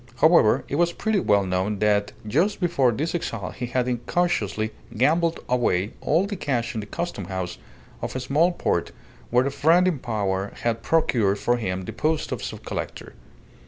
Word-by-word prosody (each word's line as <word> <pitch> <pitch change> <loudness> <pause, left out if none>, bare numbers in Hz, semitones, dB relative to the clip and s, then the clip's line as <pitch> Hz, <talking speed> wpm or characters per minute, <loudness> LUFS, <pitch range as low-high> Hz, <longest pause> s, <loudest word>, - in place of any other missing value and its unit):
However, 135 -4 +5
it 140 - -2
was 170 +1 +2
pretty 220 +1 0
well 100 - +3
known 95 +3 -1
that 105 0 +2 0.2
just 175 - +1
before 170 -9 +2
this 150 +9 -2
exile 115 - -3
he 125 - -5
had 125 0 0
incautiously 120 - 0 0.3
gambled 165 +6 +2
away 110 -6 +1
all 165 +6 +2
the 200 0 -4
cash 130 -9 -1
in 110 - -3
the 105 - -6
Custom 170 - -4
House 95 -1 -4 0.4
of - - -4
a - - -1
small 145 +7 +2
port 175 - -1 0.4
where 125 +2 +3
a 140 - 0
friend 165 +6 +4
in 170 -7 0
power 100 -5 -2
had 115 -1 0
procured 115 -8 +2
for 120 +4 +1
him 95 -5 -3
the - - -6
post 155 0 -1
of - - -3
subcollector. - - -6
125 Hz, 175 wpm, -24 LUFS, 105-165 Hz, 0.4 s, However